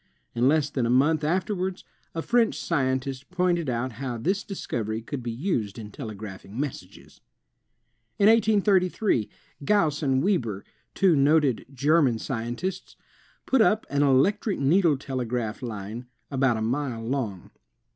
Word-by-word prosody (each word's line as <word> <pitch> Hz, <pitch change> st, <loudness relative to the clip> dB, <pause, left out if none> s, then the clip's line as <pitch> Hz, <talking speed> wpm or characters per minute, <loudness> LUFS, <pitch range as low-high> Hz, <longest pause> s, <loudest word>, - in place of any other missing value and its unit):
In 120 Hz, +2 st, +2 dB
less 150 Hz, 0 st, +2 dB
than 125 Hz, -5 st, 0 dB
a -, -, -1 dB
month 145 Hz, +5 st, +3 dB
afterwards, 185 Hz, +3 st, -1 dB, 0.3 s
a 165 Hz, -, -2 dB
French 235 Hz, -2 st, +2 dB
scientist 130 Hz, -3 st, -1 dB
pointed 175 Hz, -4 st, 0 dB
out 125 Hz, +1 st, -2 dB
how 125 Hz, +1 st, -5 dB
this 190 Hz, -, -1 dB
dis 195 Hz, -, -7 dB
covery 110 Hz, 0 st, -3 dB
could 140 Hz, 0 st, -4 dB
be 120 Hz, -, -4 dB
used 115 Hz, -, -2 dB
in 105 Hz, -2 st, -8 dB
telegraphing 105 Hz, -2 st, -8 dB
messages. 145 Hz, -2 st, -7 dB, 1.0 s
^ 200 Hz, -, +4 dB
1833, 205 Hz, -, +3 dB, 0.3 s
Gauss 160 Hz, -4 st, +2 dB
and 135 Hz, -2 st, +1 dB
Weber, 120 Hz, -, 0 dB, 0.3 s
two 185 Hz, -4 st, +4 dB
noted 145 Hz, -2 st, +3 dB
German 140 Hz, -1 st, +3 dB
scien 120 Hz, 0 st, -4 dB
tists, 185 Hz, +5 st, -5 dB, 0.5 s
put 265 Hz, -3 st, +3 dB
up 220 Hz, 0 st, +3 dB
an 140 Hz, 0 st, +1 dB
electric 185 Hz, -, +2 dB
needle 155 Hz, +2 st, +3 dB
telegraph 125 Hz, -4 st, -3 dB
line, 115 Hz, 0 st, -6 dB, 0.2 s
about 130 Hz, -4 st, +2 dB
a 110 Hz, -, -2 dB
mile 120 Hz, -1 st, -2 dB
long. 115 Hz, -8 st, -3 dB
135 Hz, 140 wpm, -26 LUFS, 120-180 Hz, 1.0 s, ^